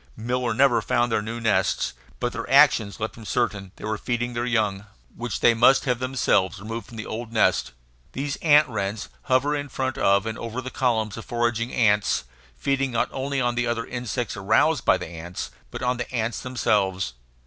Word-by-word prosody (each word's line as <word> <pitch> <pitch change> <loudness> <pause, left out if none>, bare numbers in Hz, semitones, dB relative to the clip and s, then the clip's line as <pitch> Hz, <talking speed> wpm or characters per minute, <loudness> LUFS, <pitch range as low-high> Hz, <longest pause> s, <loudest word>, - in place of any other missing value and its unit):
Miller 120 +2 -1
never 125 -2 +4
found 120 +2 +1
their 110 - +2
new 115 +2 -5
nests, 115 -2 +1 0.3
but - - -1
their - - -5
actions 100 0 +5
left 110 0 -3
him 115 - -10
certain 105 -3 -1
that 95 - -19
they - - -9
were 110 -1 -2
feeding 120 0 -2
their 120 +1 -2
young, 105 -4 0 0.3
which 120 +1 -4
they 120 - +6
must 125 +5 +5
have 125 -3 0
themselves 125 -6 +1
removed 115 +3 -6
from 115 - -11
the 110 - -5
old 115 +1 -6
nest. 65 - +2 0.4
These 140 +1 -2
ant 150 -1 +5
wrens 105 -3 -3 0.2
hover 135 +3 +2
in 145 -1 -4
front 130 0 -3
of 100 +1 +3
and 110 0 -4
over 115 +2 -4
the 130 0 -6
columns 110 -5 0
of 115 - -8
foraging 120 0 -1
ants, 105 - +2 0.3
feeding 135 -1 0
not 120 -2 0
only 140 +1 -2
on 120 -1 +1
the 120 0 0
other 115 -1 -1
insects 125 -2 -3
aroused 110 +8 +2
by - - +5
the - - -6
ants, 85 +2 -7 0.2
but - - -7
on 125 0 +1
the 120 - -5
ants 115 -2 -1
themselves. 95 - 0
120 Hz, 200 wpm, -24 LUFS, 110-125 Hz, 0.4 s, they